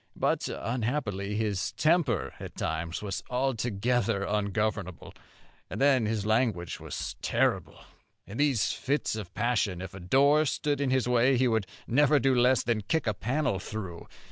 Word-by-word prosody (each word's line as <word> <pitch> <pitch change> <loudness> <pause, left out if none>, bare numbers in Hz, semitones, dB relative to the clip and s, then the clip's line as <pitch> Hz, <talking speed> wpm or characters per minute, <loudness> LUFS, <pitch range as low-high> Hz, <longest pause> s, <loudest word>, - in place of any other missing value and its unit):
But - - 0
unhappily 110 -4 -2
his 105 -3 -1
temper 155 - +1
at - - -8
times 85 +4 -3
was 100 -2 -3
altogether 120 -4 0
ungovernable, 105 -4 -2 0.6
and - - -5
then 135 -5 +4
his 110 -2 -1
language 110 -6 0
was - - -5
terrible. - - 0 0.5
In 105 - -9
these 140 -7 +2
fits 140 -3 -1
of 105 -6 -6
passion, 110 -7 0
if 95 0 -7
a 95 - -8
door 140 - +4
stood 145 +1 -1
in 140 - +1
his 130 -2 +1
way 125 +2 +3
he 130 +1 +3
would 110 -4 0 0.2
never 145 +4 +4
do 135 0 +2
less 125 +1 +4
than 115 -2 0
kick 160 +10 -1
a 110 - +1
panel 120 0 -1
through. 95 -4 -7
115 Hz, 155 wpm, -28 LUFS, 100-130 Hz, 0.6 s, then